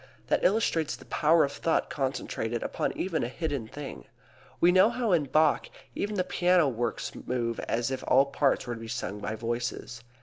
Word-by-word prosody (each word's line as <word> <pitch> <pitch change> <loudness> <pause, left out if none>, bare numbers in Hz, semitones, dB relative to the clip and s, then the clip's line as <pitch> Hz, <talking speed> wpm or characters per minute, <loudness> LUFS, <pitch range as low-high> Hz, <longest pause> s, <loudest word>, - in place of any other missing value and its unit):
That - - +2
illustrates 170 -7 +2
the - - -15
power 160 +2 +3
of 140 - 0
thought 165 +3 0
concentrated 125 -4 -2
upon - - -2
even 175 -3 -1
a - - -1
hidden 140 -3 -3
thing. 145 +3 -8 0.5
You 175 - +6
know 185 +4 +6
how 240 -2 -1
in 165 -5 +3
Bach 155 +2 +2 0.2
even 205 +1 -2
the 185 - +1
piano 180 -2 +3
works 120 -2 -2
move 120 -2 -3
as 120 +2 0
if 130 - -3
all 135 +2 +5
parts 140 0 +1
were 120 - -3
to 115 - -8
be 115 - -7
sung 110 -2 -4
by 105 +1 -3
voices. 120 +1 -4
140 Hz, 190 wpm, -28 LUFS, 120-170 Hz, 0.5 s, You